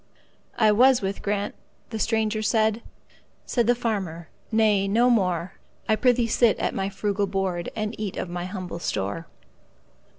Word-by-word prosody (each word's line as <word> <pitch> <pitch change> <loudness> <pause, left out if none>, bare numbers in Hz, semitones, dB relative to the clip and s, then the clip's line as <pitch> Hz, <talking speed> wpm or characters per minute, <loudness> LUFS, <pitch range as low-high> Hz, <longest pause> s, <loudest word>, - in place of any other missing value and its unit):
"I 215 -2 +5
was 250 +2 +5
with 195 +1 -3
Grant"—the 205 +2 -5
stranger 220 -1 0
said; 220 +1 +1 0.6
Said 240 -3 0
the 245 - +4
farmer, 190 -9 -3 0.2
"Nay, 215 -3 +3
no 235 +5 +3
more,—I 185 +1 -1
prithee 245 +1 +3
sit 230 -1 +3
at - - -1
my 195 0 -1
frugal 200 0 -1
board, 190 -3 -2
And 215 0 -2
eat 210 -3 -4
of - - -3
my 175 0 -4
humble 185 -3 -6
store. 100 - -3
210 Hz, 140 wpm, -25 LUFS, 190-225 Hz, 0.6 s, I